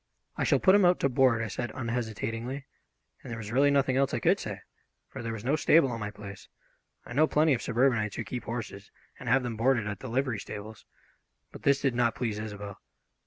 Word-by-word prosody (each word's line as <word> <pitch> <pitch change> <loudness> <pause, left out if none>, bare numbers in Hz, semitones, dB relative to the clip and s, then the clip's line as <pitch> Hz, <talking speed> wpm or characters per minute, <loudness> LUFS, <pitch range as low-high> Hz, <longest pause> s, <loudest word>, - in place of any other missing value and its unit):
"I - - -1
shall - - +4
put 190 - +5
him 205 0 +5
out 180 0 +4
to 140 - +3
board," 125 -2 +3
I - - -2
said 120 +3 -4
unhesitatingly, 115 +2 -3 0.6
and - - -10
there 115 - -5
was 110 -1 -7
really 140 +4 +4
nothing 140 -2 +2
else 135 0 +2
I - - -1
could - - +3
say, - - -6 0.5
for - - -8
there 115 -1 -4
was 110 0 -6
no 140 +4 +2
stable 155 -3 +4
on 115 - -4
my 105 -1 -3
place. 100 -2 -10 0.6
I - - -8
know 155 +5 +4
plenty 155 0 +3
of 120 - -1
suburbanites 120 -4 +1
who 115 - -3
keep 120 0 -6
horses 110 -4 -6 0.3
and - - -5
have 135 - +4
them 120 -3 -4
boarded 120 -1 +2
at 105 -1 -4
the 130 - -7
livery 130 -2 0
stables. 105 +2 -8 0.7
But - - -11
this 140 -1 +3
did 135 -3 +1
not 120 -1 +1
please 110 -4 -2
Isobel. 105 -2 -7
120 Hz, 220 wpm, -29 LUFS, 110-135 Hz, 0.7 s, put